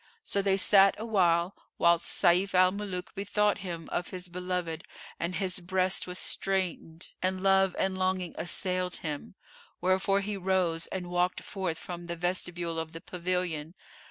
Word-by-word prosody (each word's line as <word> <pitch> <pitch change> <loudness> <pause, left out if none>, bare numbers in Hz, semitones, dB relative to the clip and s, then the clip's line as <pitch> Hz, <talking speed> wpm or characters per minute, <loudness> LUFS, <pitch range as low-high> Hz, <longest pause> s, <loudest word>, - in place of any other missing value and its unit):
So 200 - +1
they 195 -1 +2
sat 195 +1 +6
awhile, 185 -5 +2 0.2
whilst 170 0 +3
Sayf 185 +3 +3
al 185 0 +6
Muluk 190 -3 -5
bethought 205 +1 +1
him 170 -3 -6
of 175 - -1
his 180 -1 -6
beloved 180 -2 -3 0.4
and 170 +2 -2
his 190 -1 -1
breast 185 +1 0
was 180 0 -5
straitened 185 -4 -2
and 185 0 0
love 195 -1 +4
and 190 0 0
longing 185 -1 -1
assailed 180 0 -1
him: 150 +4 -5 0.4
wherefore 190 +2 +2
he 205 0 -3
rose 180 -3 0
and 180 -2 -5
walked 180 +1 0
forth 185 -5 -3
from 175 -1 -7
the 170 - -3
vestibule 175 -1 -1
of 160 0 -5
the 165 - -7
pavilion. 180 -3 -3
180 Hz, 155 wpm, -29 LUFS, 175-190 Hz, 0.4 s, sat